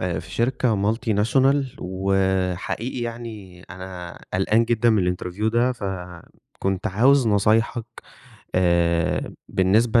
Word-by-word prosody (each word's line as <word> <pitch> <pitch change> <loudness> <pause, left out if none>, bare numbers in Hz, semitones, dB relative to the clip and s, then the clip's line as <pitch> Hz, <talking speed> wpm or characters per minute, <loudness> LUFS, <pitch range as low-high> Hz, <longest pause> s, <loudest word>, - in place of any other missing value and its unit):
آآ 90 -3 -2
في 85 +3 -9
شركة 115 -2 +1
multinational 125 +5 +2
وحقيقي 95 +4 -1
يعني 115 -6 -7
أنا 90 -1 -8 0.2
قلقان 105 +5 +3
جدًا 120 0 +2
من 90 -5 +2
الinterview 90 +4 -5
ده، 120 +2 +2
فكنت 95 -1 -5
عاوز 125 +6 +4
نصايحك 110 +3 +2 0.7
آآ 85 -2 +1 0.2
بالنسبة 110 +5 +3
100 Hz, 100 wpm, -23 LUFS, 90-115 Hz, 0.7 s, عاوز